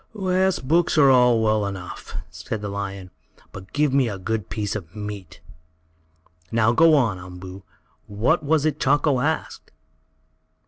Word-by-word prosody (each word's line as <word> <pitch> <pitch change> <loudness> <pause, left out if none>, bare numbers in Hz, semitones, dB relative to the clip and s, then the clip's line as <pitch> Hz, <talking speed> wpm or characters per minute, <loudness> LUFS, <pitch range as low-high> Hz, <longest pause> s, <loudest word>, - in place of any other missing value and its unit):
"Yes, 185 0 +1
books 165 +5 +1
are 140 -3 +6
all 125 -3 +4
well 110 -1 +2
enough," 95 -2 -8 0.2
said 110 - -6
the 105 - -3
lion, 100 -2 -6 0.4
"but 95 0 -11
give 150 -2 +1
me 135 -4 +3
a 100 - -5
good 105 +1 -3
piece 105 -1 -3
of 95 -2 -7
meat. 105 -5 -8 1.1
Now 115 0 +3
go 160 +5 +5
on, 115 -10 +1
Umboo. 90 +1 -10 0.5
What 110 +12 +1
was 155 0 +1
it 155 -1 0
Chako 145 -1 +2
asked?" 155 +5 -3
110 Hz, 145 wpm, -23 LUFS, 100-145 Hz, 1.1 s, are